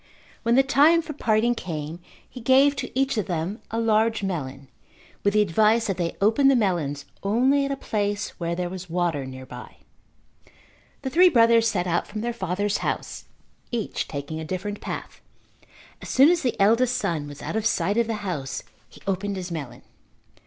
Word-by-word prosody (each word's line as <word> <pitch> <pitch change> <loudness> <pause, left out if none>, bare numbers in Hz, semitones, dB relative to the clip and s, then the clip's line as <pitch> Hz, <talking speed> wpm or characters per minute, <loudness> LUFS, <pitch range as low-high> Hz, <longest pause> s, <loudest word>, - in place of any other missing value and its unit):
When 235 0 +2
the 270 - +6
time 295 +5 +4
for 310 - -6
parting 230 -3 +2
came 160 -6 -5 0.3
he 250 - -10
gave 270 +4 +5
to 250 -2 -3
each 270 -4 +1
of 210 - -3
them 175 +4 -3
a 225 - -2
large 220 -1 +2
melon 135 -8 -4 0.6
with 200 +1 +2
the 210 - +5
advice 215 +5 +3
that 195 -3 -2
they 170 -2 -2
open 225 +7 +4
the 275 - +6
melons 165 - 0 0.2
only 260 +8 +2
at 275 - -3
a - - 0
place 205 -4 -2
where 170 0 -2
there 180 0 -2
was 180 0 -7
water 165 -5 -1
nearby. 130 -1 -10 1.3
The 265 - -3
three 360 +4 +6
brothers 230 -4 +5
set 180 -5 0
out 175 -1 0
from 215 0 -5
their 240 +1 -2
father's 200 -1 -1
house, - - -4 0.4
each 235 -3 -3
taking 145 +2 -5
a - - -5
different 195 +5 -4
path. - - -6 0.8
As - - -8
soon 275 +5 +6
as 350 - +1
the 250 -4 -2
eldest 230 +5 +3
son 155 -4 -2
was 145 0 -10
out - - -4
of 220 0 +1
sight 205 -1 0
of 235 -1 +2
the 225 - -1
house 145 -8 -4 0.3
he - - -17
opened 195 +1 -2
his 180 -2 -5
melon. 150 -7 -6
205 Hz, 185 wpm, -24 LUFS, 175-235 Hz, 1.3 s, the